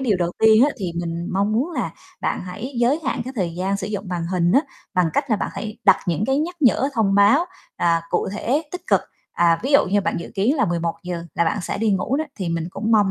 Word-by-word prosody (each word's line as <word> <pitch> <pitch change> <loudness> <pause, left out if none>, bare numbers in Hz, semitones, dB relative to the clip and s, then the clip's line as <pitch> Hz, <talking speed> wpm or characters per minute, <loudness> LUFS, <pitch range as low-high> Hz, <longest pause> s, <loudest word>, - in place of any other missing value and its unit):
điều 235 -7 +2
đầu 175 -1 -1
tiên 220 +3 +6
á 295 - +2
thì 185 -5 -3
mình 170 0 -4
mong 200 +3 +1
muốn 255 +10 0
là - - -2 0.3
bạn - - -1
hãy 215 +9 -6
giới 250 +6 +2
hạn - - -1
cái 260 - -6
thời 175 -5 -1
gian 190 +3 -1
sử 200 - -4
dụng 205 -2 -4
màn 175 -2 -3
hình 175 -1 +1
á, 270 - +6 0.3
bằng 180 -2 +3
cách 280 - -1
là 215 - +4
bạn - - -2
hãy 215 0 -6
đặt 195 - +7
những 175 +3 0
cái 270 +1 +2
nhắc 345 +4 -2
nhở, 270 0 +3
thông 210 -4 +2
báo, 205 - +5 0.3
à, 165 -1 +2
cụ - - 0
thể, 255 +8 0
tích 360 - -7
cực. - - +4 0.3
À, 170 -1 +3
ví 270 +4 -1
dụ 280 - +6
như 205 +2 +2
bạn - - -1
dự - - -8
kiến 215 +10 +2
là - - +3
11:00 170 +1 -3
là 170 - +2
bạn 165 - 0
sẽ - - -3
đi 220 0 +1
ngủ 195 +7 0
đó 310 - -1
thì 185 -4 -3
mình 165 -1 -2
cũng 220 +5 -2
mong 205 -3 +4
200 Hz, 260 wpm, -22 LUFS, 175-245 Hz, 0.3 s, đặt